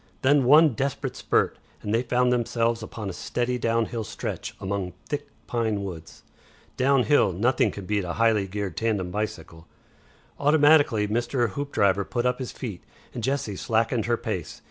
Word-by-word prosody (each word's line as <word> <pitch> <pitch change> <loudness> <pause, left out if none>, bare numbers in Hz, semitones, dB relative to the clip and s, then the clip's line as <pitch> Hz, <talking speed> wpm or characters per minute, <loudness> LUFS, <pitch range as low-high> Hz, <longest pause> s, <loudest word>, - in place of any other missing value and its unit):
Then 140 0 +4
one 150 +5 +7
desperate 135 +2 -3
spurt, - - 0 0.2
and 105 - -2
they 115 - +3
found 125 0 +2
themselves 115 -1 0
upon 110 -1 -6
a 95 - -4
steady 125 +6 -2
downhill 115 0 0
stretch 100 - -5
among 95 -2 -3
thick - - -3 0.2
pine 110 -4 -1
woods. 85 -4 -8 0.5
Downhill 135 -3 +3
nothing 120 +8 +2
can 100 - -7
beat 105 0 0
a 85 -1 -3
highly 110 -2 +2
geared 95 -3 -4
tandem 105 -5 -1
bicycle. 105 -6 -5 0.7
Automatically 145 -7 +4
Mr. 120 +2 0
Hoopdriver 100 -5 +1
put 120 0 -2
up 125 +1 +1
his 130 - -4
feet, 105 -9 -7 0.3
and 120 - -5
Jessie 130 -5 -1
slackened 115 +2 0
her 120 0 +2
pace. - - -5
115 Hz, 155 wpm, -25 LUFS, 100-125 Hz, 0.7 s, one